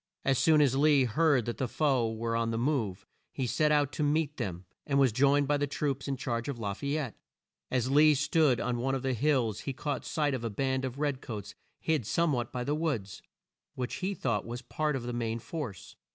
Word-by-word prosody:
As 135 -2 +3
soon 155 -2 +5
as 135 -3 +3
Lee 145 -1 +5
heard 135 0 +2
that 120 -3 -3
the 130 - 0
foe 130 -4 +1
were 115 +1 -2
on 115 0 0
the 115 - -1
move, 115 -8 -1 0.3
he 130 - -2
set 150 +6 +2
out 145 -2 +3
to - - -4
meet 150 0 +1
them, 95 -7 -4 0.2
and 140 -2 +1
was 135 -3 +5
joined 140 +4 +3
by 145 +1 +2
the 145 0 0
troops 140 -1 -2
in 135 -1 -1
charge 120 0 -2
of 140 - -3
La 105 -3 -2
fay 140 +7 -2
ette. 135 -7 -3 0.6
As 130 0 0
Lee 150 +1 +6
stood 145 -3 +3
on 120 0 -1
one 135 +2 0
of 135 - -4
the 130 -1 0
hills 125 -4 +1
he 135 - -4
caught 145 +2 -3
sight 150 -3 0
of 125 -3 -3
a 115 - -1
band 130 +4 -1
of 130 0 -5
red 145 -2 -1
coats 110 -6 -6 0.3
hid 155 -9 0
some 170 +1 +2
what 120 -1 -2
by 125 0 -3
the 145 - -1
woods, 140 - -2 0.5
which 125 -1 -3
he 195 +1 -2
thought 115 - -1
was 120 +2 -6
a - - -25
part 150 +4 -1
of 130 - -3
the 120 0 -4
main 115 -1 -2
force. 115 - -7
130 Hz, 235 wpm, -30 LUFS, 120-145 Hz, 0.6 s, Lee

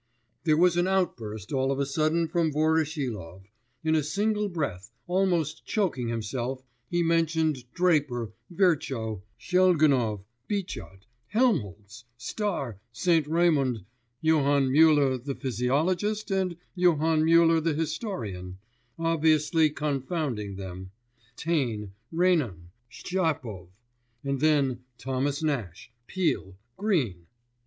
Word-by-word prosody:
There 155 -2 +4
was 175 0 +4
an 175 +1 +2
outburst 115 - -2
all 135 0 +1
of 135 - -1
a 140 - +1
sudden 155 +4 +1
from 165 -1 +1
Voroshilov; 145 - -1 0.4
in 160 0 +2
a 155 - +3
single 210 +6 0
breath, 115 - -3 0.2
almost 175 -4 0
choking 180 - -1
himself, 120 +3 -3 0.3
he 175 0 +1
mentioned 160 -6 +1
Draper, 145 -10 +1 0.2
Virchow, 135 - 0 0.2
Shelgunov, 150 - +3 0.2
Bichat, 175 - -5 0.2
Helmholtz, 115 - -1
Star, 140 - -3
St. 160 +4 +2
Raymund, 145 - +2 0.4
Johann 145 -4 +3
Müller 140 -3 +4
the 140 -1 -3
physiologist, 165 - 0
and 185 -3 0 0.2
Johann 165 -3 +3
Müller 165 0 +5
the 160 -2 +1
historian 120 - -4 0.4
obviously 160 -1 +3
confounding 140 - -2
them 95 -1 -7 0.5
Taine, 120 - -1 0.2
Renan, 150 - +1 0.2
Shtchapov; 150 - -2 0.6
and 140 -1 -1
then 140 -4 +2 0.2
Thomas 135 +3 -2
Nash, 120 - -3 0.2
Peele, 160 - -1 0.2
Greene.... 130 - -1
150 Hz, 105 wpm, -27 LUFS, 120-170 Hz, 0.6 s, Müller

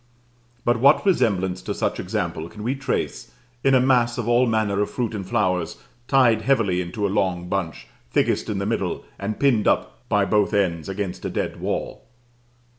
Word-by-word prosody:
But 120 -1 +2
what 140 - +5
resemblance 100 - +1
to - - -4
such - - -1
example 80 +1 -3
can 105 +1 -9
we 125 +4 0
trace 135 -1 -3 0.3
in 135 -1 +4
a - - +6
mass 125 -2 +3
of 120 -2 -3
all 120 +1 +4
manner 110 -3 +1
of 105 - 0
fruit 120 -3 -2
and 100 -2 -4
flowers, 90 -5 0 0.3
tied 120 -5 +4
heavily 110 -7 +2
into 90 +4 -3
a 100 +1 -1
long 90 -3 0
bunch, 90 -3 -3 0.2
thickest - - +1
in 105 - -1
the 100 - -2
middle, 100 -5 -2
and 100 +2 -4
pinned 125 -7 +3
up - - +1
by 100 -1 +3
both 105 0 +2
ends 90 -4 0
against 95 -1 -4
a - - -2
dead - - -3
wall? - - -4
105 Hz, 185 wpm, -23 LUFS, 95-120 Hz, 0.3 s, a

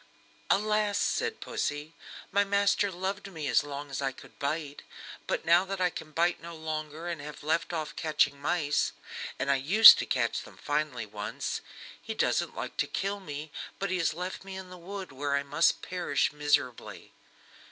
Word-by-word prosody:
"Alas!" 210 0 +2
said 455 - 0
Pussy, 145 +2 -3 0.4
"my 200 +1 +4
master 200 0 +2
loved 195 +2 -4
me 155 -5 -4
as - - +4
long 145 0 -6
as 135 - -3
I 135 -1 0
could 130 - -16
bite, 145 0 -3 0.5
but - - -1
now 170 +2 +6
that 195 0 -4
I 180 -1 +2
can 155 - -7
bite 170 +3 +1
no 170 0 -8
longer 155 +1 -5
and 170 -4 -3
have 150 0 -9
left 160 +4 0
off 155 -3 -3
catching 145 -3 +1
mice 150 -1 +1 0.4
and 140 +2 +1
I 140 - +4
used 195 +12 +10
to - - -2
catch - - 0
them - - -14
finely 150 -5 -1
once 105 0 -4 0.4
he - - -5
doesn't - - +1
like - - -5
to - - +1
kill 200 +1 -2
me, 150 -4 -7 0.3
but 195 -1 -2
he 185 - 0
has 165 -2 +1
left 180 +3 -5
me 195 0 -8
in 185 -1 -9
the 180 - -9
wood, 190 +1 -7
where 140 +1 -1
I 140 - +1
must 150 +4 +2
perish 175 -6 0
miserably." 145 -4 -1
160 Hz, 185 wpm, -29 LUFS, 145-190 Hz, 0.5 s, used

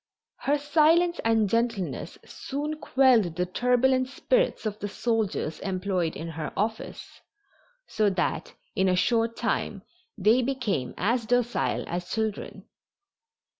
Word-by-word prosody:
Her 290 +1 +4
silence 325 +4 +3
and 225 -2 +3
gentleness 230 -3 -1
soon 295 +3 -5
quelled 245 - +3
the 180 - 0
turbulent 250 +6 +2
spirits - - 0
of 215 -1 -3
the 205 - -3
soldiers 215 -7 -1
employed 185 -3 -1
in 165 - -5
her 160 -1 -5
office, 220 +2 -4 0.6
so 215 -1 +1
that 180 -4 -2 0.2
in 190 0 +2
a 180 - +3
short 230 +4 +1
time 200 -4 -2 0.3
they 220 +5 +4
became 235 - -2
as 230 +3 0
docile 245 0 +1
as 175 +1 -4
children. 220 -2 -3
225 Hz, 125 wpm, -27 LUFS, 190-255 Hz, 0.6 s, Her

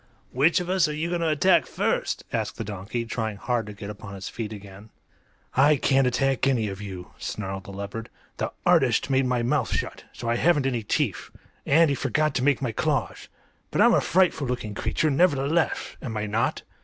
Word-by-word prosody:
"Which 150 +9 +3
of 180 - -4
us 185 -2 +3
are 150 - -3
you 160 +3 -2
going 175 -1 -1
to 165 - +1
attack 165 +5 +3
first?" - - -1
asked 110 -2 -2
the - - -3
donkey, 105 +3 -4
trying 110 -2 -3
hard 120 0 -1
to 105 - -7
get 100 0 -7
upon 105 -1 -9
his 95 -1 -6
feet 110 -2 -5
again. 100 0 -11 0.6
"I 145 +3 +5
can't 135 -1 +3
attack 135 +1 +1
any 115 -6 +1
of 95 +1 -7
you," 95 -3 -8
snarled 95 -2 -5
the - - -8
leopard. 100 +3 -6 0.3
"The - - -2
artist - - +3
made 135 -1 +3
my 125 -1 0
mouth 130 0 0
shut, - - -3
so 120 - -7
I 115 0 +1
haven't 150 -1 +3
any 125 -3 0
teeth; 105 - -1 0.4
and 165 +4 +5
he 140 - +1
forgot 140 +4 0
to 125 - -1
make 140 -1 +2
my 120 - 0
claws. - - -1 0.4
But - - -2
I'm - - +6
a - - +4
frightful 175 -5 +2
looking 120 -4 -3
creature, 115 +9 0
nevertheless; 155 +1 +1
am 110 -4 -4
I 105 - -1
not?" 110 +3 -1
125 Hz, 205 wpm, -25 LUFS, 105-145 Hz, 0.6 s, I'm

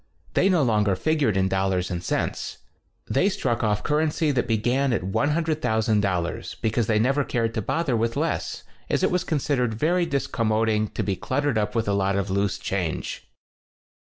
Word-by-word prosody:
They 195 - +3
no 175 -6 +3
longer 105 -5 +2
figured 145 -4 +1
in 95 0 +2
dollars 95 -1 0
and 85 -1 -3
cents. - - -2 0.5
They 180 +9 +2
struck 120 - -1
off 105 -1 +1
currency 150 0 +1
that 125 -3 0
began 120 +4 +1
at 115 - -1
$100,000, 110 - 0
be 110 - +1
cause 115 -1 0
they 110 - +2
never 135 +6 +2
cared 115 -3 -1
to 110 - -1
bother 150 +4 0
with 115 +1 0
less, - - -2 0.3
as - - +1
it - - +4
v/as 180 -1 +1
considered 130 -6 0
very 170 +8 +1
discom 135 -6 -1
moding 110 0 +2
to - - -1
be 100 - -1
cluttered 140 +2 0
up 105 +1 -2
with 115 -2 0
a 100 - +2
lot 100 0 +1
of 100 -1 -1
loose 100 0 0
change. 90 -5 -3
115 Hz, 180 wpm, -24 LUFS, 100-145 Hz, 0.5 s, it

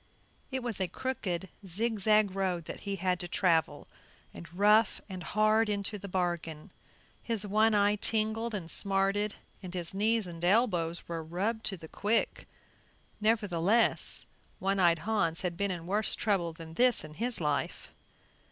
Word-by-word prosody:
It 260 -2 -3
was 230 -5 -3
a 185 - +1
crooked, 190 -4 -3 0.2
zigzag 215 +1 +2
road 185 -4 -1
that - - -7
he 200 -1 -4
had 180 -1 0
to 175 - -1
travel, 170 -2 +1 0.5
and 170 - -10
rough 210 +4 +4
and 185 -3 -7
hard 215 +4 +2
into 205 0 0
the 200 - -8
bargain. 175 -4 -3 0.5
His 225 -3 -1
one 215 +2 +3
eye 205 0 +3
tingled 220 +1 0
and 170 -5 -2
smarted, 200 +1 +1 0.3
and 185 -1 -7
his 175 -1 -2
knees 220 +2 +1
and 170 -1 -9
elbows 175 -5 +1
were 165 -1 -4
rubbed 200 +8 -2
to 195 - -1
the 160 -1 -10
quick; 215 +7 -1 0.7
nevertheless 210 -1 +2 0.3
One 195 +1 0
eyed 170 -3 +4
Hans 170 -7 0
had 180 -2 -2
been 200 +3 -1
in 175 -3 -4
worse 205 +4 0
trouble 195 -6 0
than 160 0 -11
this 245 +5 +4
in 155 0 -10
his 235 +7 0
life. 150 -3 -2
195 Hz, 155 wpm, -30 LUFS, 175-215 Hz, 0.7 s, rough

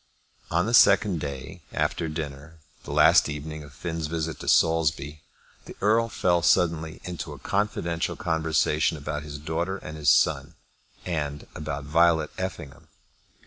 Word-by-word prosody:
On 85 +2 +1
the 115 - -2
second 100 -6 +5
day 70 +5 -6
after 80 - -1
dinner, 75 0 -7 0.3
the - - -7
last - - +5
evening 75 +1 -6
of 70 - -13
Finn's 80 +2 -4
visit 80 0 -3
to - - -8
Saulsby, 80 -2 +2 0.4
the - - -10
Earl 115 +3 +2
fell 90 -4 +1
suddenly 80 +1 +1
into 90 -4 -6
a - - -10
confidential 85 -5 -1
conversation 80 -1 +1
about 75 +1 -4
his 75 -1 -8
daughter 80 +5 -3
and 75 -4 -9
his 75 -1 +2
son, 70 +4 +2 0.5
and 75 -4 -3
about 75 -2 -5
Violet 80 +1 +3
Effingham. 85 -7 -6
80 Hz, 145 wpm, -26 LUFS, 75-85 Hz, 0.5 s, second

